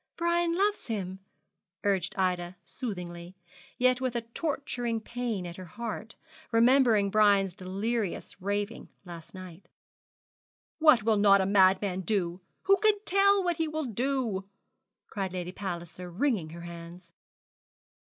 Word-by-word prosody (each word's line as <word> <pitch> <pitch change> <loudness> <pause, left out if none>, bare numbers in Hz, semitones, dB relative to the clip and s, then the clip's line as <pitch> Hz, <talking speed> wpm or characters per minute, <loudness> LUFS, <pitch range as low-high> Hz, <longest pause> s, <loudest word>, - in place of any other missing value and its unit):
Brian 340 0 +1
loves 410 +2 +1
him,' 190 -4 -4 0.6
urged 195 -3 0
Ida 180 -1 0
soothingly, 175 -3 -7 0.4
yet 255 0 +3
with 255 -2 -1
a 235 - 0
torturing 240 -2 -3
pain 230 -4 -4
at 175 0 -7
her 185 - -8
heart, 220 +3 -6 0.4
remembering 230 -4 +4
Brian's 200 -3 +4
delirious 195 +2 -3
raving 205 +3 -3 0.2
last 170 0 -10
night. 185 -1 -11 1.1
'What 305 -9 +6
will 220 -1 +3
not 200 -1 +6
a 190 - +2
madman 190 -1 +3
do? 185 -3 -1 0.2
Who 395 0 +5
can 425 +1 +3
tell 395 +1 +4
what 350 -2 0
he 325 - 0
will 310 -1 -3
do?' 235 -5 -2 0.6
cried 195 -3 -4
Lady 180 -1 -4
Palliser, 180 -2 -6
wringing 195 - 0
her 170 +2 -9
hands. 170 0 -10
205 Hz, 130 wpm, -29 LUFS, 185-250 Hz, 1.1 s, What